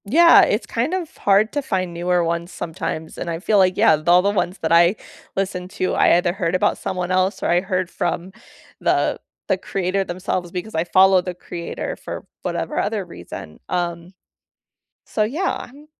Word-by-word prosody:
Yeah, 335 +11 +7
it's 210 - +1
kind 250 +10 -1
of 350 -4 -5
hard 205 +2 +3
to 290 - 0
find 185 -8 -2
newer 175 +1 +1
ones 170 +1 -2
sometimes, 160 -1 -5
and 175 - -4
I 165 - -2
feel 205 +2 +2
like 185 -1 +3
yeah, 155 -1 +4
all 175 +1 +6
the 200 - +2
ones 185 -2 -1
that 160 - -2
I 170 +3 +5 0.4
listened 185 -2 -2
to, 185 - -1
I - - +5
either 175 0 +1
heard 180 -2 -1
about 185 - +1
someone 180 -1 -3
else 185 +2 +1
or - - +1
I 175 +1 +3
heard 185 -1 -2
from 180 +3 -3 0.5
the - - +1 0.3
the - - +2
creator 195 +1 -1
themselves 180 -1 -3
because 185 +5 -5
I 160 +1 0
follow 190 +1 +5
the 180 0 -5
creator 170 -1 -5
for - - -8 0.2
whatever - - -2
other - - -1
reason, 80 -1 -10
um, 175 0 -3 0.9
so 215 - -1
yeah, 300 - -1
I'm 290 +4 -16
185 Hz, 185 wpm, -21 LUFS, 175-195 Hz, 0.9 s, Yeah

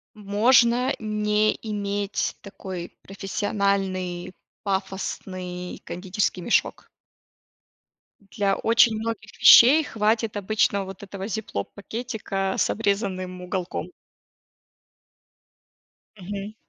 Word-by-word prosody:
можно 235 +4 +3
не 210 0 +1
иметь 205 -2 -2
такой 185 -3 -7
профессиональный 195 -2 -2 0.3
пафосный 190 -2 -4
кондитерский 185 +1 -2
мешок. 230 - 0 1.4
Для 200 -2 +1
очень 230 0 +4
многих 220 -1 -5
вещей 285 +7 +9
хватит 220 -3 0
обычного 200 -1 +1
вот 190 +1 -9
этого 195 0 -6
зиплок-пакетика 205 - -4
с - - +2
обрезанным 190 -4 -2
уголком. 180 0 -4 2.3
Мгм. 200 +3 -6
200 Hz, 75 wpm, -24 LUFS, 190-215 Hz, 2.3 s, вещей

